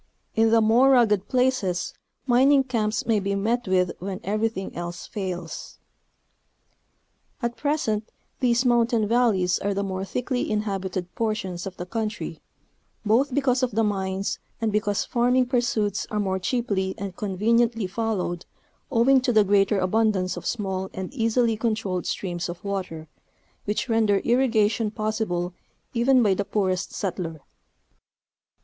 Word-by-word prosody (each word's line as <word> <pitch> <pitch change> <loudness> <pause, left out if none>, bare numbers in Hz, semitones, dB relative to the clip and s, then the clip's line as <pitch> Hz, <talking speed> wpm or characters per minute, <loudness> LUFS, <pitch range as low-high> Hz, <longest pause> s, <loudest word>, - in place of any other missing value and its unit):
In 225 0 +3
the 225 0 +5
more 235 +5 +5
rugged 220 -7 +4
places 250 -9 0 0.3
mining 270 +2 +5
camps 220 -4 -1
may 225 -3 +2
be 200 0 -1
'met 230 +4 0
with 180 -2 +2
when 190 +1 -5
everything 215 -1 -2
else 175 0 -5
fails. 180 -6 -6 1.6
At 235 -1 -2
present 230 -5 -1 0.3
these 245 0 +2
mountain 235 -2 +3
valleys 210 -6 +2
are 200 0 -1
the 200 - 0
more 190 -1 -3
thickly 245 +5 -2
inhabi 200 -3 -2
ted 180 -1 -4
portions 200 -5 -2
of 190 - -8
the 175 - -5
country, 215 +3 -4 0.6
both 245 +7 +3
because 265 -2 +2
of 255 -4 0
the 225 - +3
mines 195 -2 -1 0.2
and 225 -1 0
because 205 -1 0
farming 250 +1 +2
pursuits 240 -5 0
are 210 - -1
more 190 -2 0
cheaply 190 -3 -1
and 195 -2 -5
conveniently 225 +3 +1
followed 190 -4 -2 0.4
owing 260 +2 +4
to 250 - +1
the 215 -2 +5
greater 200 0 +3
abundance 190 -1 +1
of - - -6
small 190 -4 -2
and 190 +6 -5
easily 230 -2 +2
controlled 215 -5 -2
streams 175 -1 -3
of 175 0 -7
water, 185 -6 -4 0.6
which 210 +4 -1
render 225 -3 +3
irrigation 230 -3 +2
possible 215 -5 -2 0.4
even 250 +1 +4
by 205 -3 +4
the 200 - -1
poorest 190 -3 -1
settler. 175 -5 -4
215 Hz, 140 wpm, -25 LUFS, 190-235 Hz, 1.6 s, the